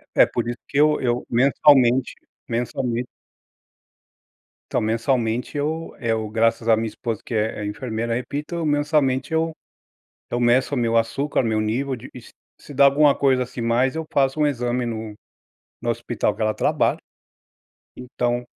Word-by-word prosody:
É, - - +7
por - - -3
isso 120 - -4
que 140 - -1
eu 150 0 +4
eu 120 -1 -1
mensalmente 130 0 +4 0.3
mensalmente 120 +1 -2 1.7
então, - - +1
mensalmente 115 +3 -1
eu 160 +3 -3
eu, 110 -2 -1
graças 115 +1 +1
à 110 - +7
minha 110 +1 -2
esposa, 115 -1 -4
que - - -6
é 110 -1 -1
é - - -3
enfermeira, 115 +1 -3
repito 145 +7 -4
mensalmente 145 -1 +1
eu 165 0 +1 0.8
eu 120 - -1
meço 125 +4 +2
meu 115 -2 +1
açúcar, 130 +5 0
meu 110 -2 0
nível 130 +5 -1
de 120 +2 -11
e - - -10
s 120 - -13 0.3
se 145 - -12
dá 140 +1 +5
alguma 140 +1 +5
coisa 130 -2 +2
assim, 125 - -9
mais, 120 +4 +1
eu 160 - -3
faço 135 +1 +1
um 150 - +4
exame 125 -2 -1
no 110 -2 -5 0.7
no - - -2
hospital - - -1
que - - -8
ela 110 0 +1
trabalha. - - +1 1.0
Então 125 -1 -2
125 Hz, 160 wpm, -22 LUFS, 115-140 Hz, 1.7 s, É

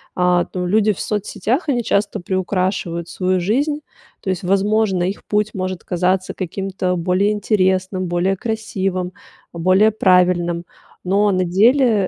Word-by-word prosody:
А, 180 -1 +2
ну, 180 -1 -2
люди 210 +3 +2
в - - -12
соцсетях 220 - -2
они 245 -4 +1
часто 205 0 0
приукрашивают 185 -2 -2
свою 185 0 0
жизнь. 290 - 0 0.4
То 195 - -4
есть, 185 -1 -2
возможно, 195 0 +1
их 190 +3 -3
путь 210 0 0
может 185 -1 -4
казаться 185 +1 0
каким-то 185 0 -3
более 185 +4 +1
интересным, 185 -3 0
более 180 +2 0
красивым, 195 -5 -2 0.4
более 185 +6 +3
правильным, 180 -3 +2 0.4
но 200 +2 +2
на 185 -1 +1
деле 215 +2 +3
190 Hz, 135 wpm, -19 LUFS, 180-210 Hz, 0.4 s, более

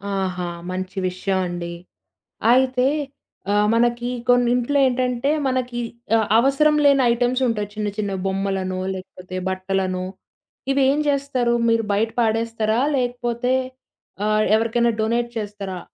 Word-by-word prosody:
ఆహా! 185 -2 -2 0.2
మంచి 185 +1 -5
విషయం 185 +1 -1
అండి. 175 -1 -5 0.8
అయితే, 255 0 +3 0.7
ఆహ్, 210 0 +3
మనకి 240 +1 +1 0.2
కొన్ని 245 -1 +4
ఇంట్లో 250 +4 0
ఏంటంటే, 250 +1 0 0.2
మనకి 255 -2 -1 0.4
ఆహ్, 220 - +1
అవసరం 275 +4 +3
లేని 280 -2 +5
ఐటెమ్సుంటాయి, 240 -3 0
చిన్న 210 -1 -2
చిన్న 205 -2 -2 0.2
బొమ్మలనో 190 -1 -2 0.2
లేకపోతే 185 0 -8
బట్టలనో. 185 -1 -2 0.7
ఇవ్వేం 275 +1 +3
చేస్తారు? 275 -4 0 0.2
మీరు 230 0 +2
బయట 220 +3 +1
పాడేస్తారా? 225 0 0 0.2
లేకపోతే? 245 0 -1 0.7
ఆహ్, 215 0 +2
ఎవరికైనా 230 +1 +2
డొనేట్ 235 +2 0
చేస్తారా? 200 -3 -5
230 Hz, 115 wpm, -22 LUFS, 195-250 Hz, 0.8 s, లేని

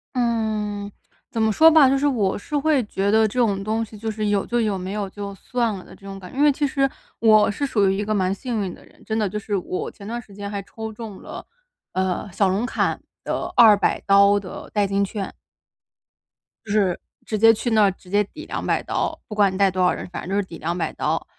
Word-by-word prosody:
嗯， 215 -4 -1 0.4
怎 225 - -1
么 220 0 +3
说 320 +9 +7
吧， 315 -4 +7
就 275 - +3
是 285 +2 +1
我 215 -9 +1
是 295 +8 -3
会 285 -2 +2
觉 200 -1 -1
得 220 0 +4
这 250 +4 -3
种 200 -5 +1
东 220 +2 -1
西 215 0 -13
就 220 +2 -4
是 215 -1 -2
有 205 -1 +1
就 240 - 0
有， 210 -4 0
没 185 +1 -5
有 205 -1 -2
就 200 0 -7
算 235 +2 -1
了 185 - -10
的 - - -14
这 200 - -18
种 195 0 -7
感 185 -1 -11
觉。 - - -11
因 285 - +3
为 295 - +6
其 290 +2 -1
实 275 -1 +1 0.3
我 215 -2 +5
是 280 +8 -2
属 210 -7 +2
于 190 - +1
一 205 - -1
个 215 +1 -1
蛮 190 -2 +1
幸 230 +1 -3
运 185 -2 -4
的 - - -15
人， - - -23
真 220 - -2
的， 215 -2 +1
就 210 - -4
是 210 0 -3
我 185 -1 -3
前 200 - -12
段 235 +2 -3
时 215 -3 -17
间 200 0 -6
还 200 -1 -4
抽 220 +3 -7
中 215 -2 -9
了， - - -9 0.5
呃， 185 +2 -1
小 195 +2 +2
龙 200 +5 0
坎 - - 0 0.2
的 - - -3
200 215 -4 +5
刀 200 +1 +6
的 190 -2 -9
代 205 -2 +2
金 200 +1 +1
券。 200 -1 -5 1.3
就 210 - -6
是 200 -4 +2 0.3
直 215 - -2
接 225 +2 +7
去 225 +2 -2
那 215 -1 +5
儿， 200 - +4
直 185 0 -17
接 205 +2 +3
抵 310 +10 -11
200 - - -1
刀 - - -2
不 210 - -7
管 200 -2 +3
你 - - -4
带 200 0 +4
多 185 0 -1
少 180 - +4
人， - - -6
反 180 - -6
正 - - -7
就 - - 0
是 205 - +2
抵 165 - -9
200 170 0 -2
刀。 - - -1
210 Hz, 260 characters per minute, -22 LUFS, 195-225 Hz, 1.3 s, 说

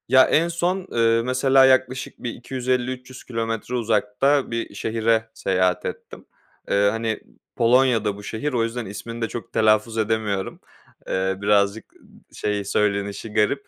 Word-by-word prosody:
Ya, 130 +1 +7
en 165 +2 +3
son, 175 +2 -1
ııı, 115 0 +3
mesela, 130 +2 +4
yaklaşık 130 -1 +2
bir 120 - -2
250-300 130 0 -3
kilometre 115 0 -3
uzakta 115 +5 +1
bir 115 -2 -3
şehre 115 +1 0
seyahat 90 -3 0
ettim. - - -7 0.4
Iıı, 100 0 +3
hani, 115 0 -2 0.4
Polonya'da 115 -3 +3
bu 100 - -11
şehir. 130 +8 -3
O 120 -2 +2
yüzden 115 +1 -3
ismini 115 +4 -7
de 115 - 0
çok 115 0 -8
telaffuz 110 +1 +2
edemiyorum. 110 -3 -1 0.5
Iıı, 95 +1 -1
birazcık, 100 +1 +1
ııı, - - -22 0.2
şey, 105 -1 -2
söylenişi 100 +1 -1
garip. 125 +6 +1
115 Hz, 140 wpm, -23 LUFS, 105-125 Hz, 0.5 s, Ya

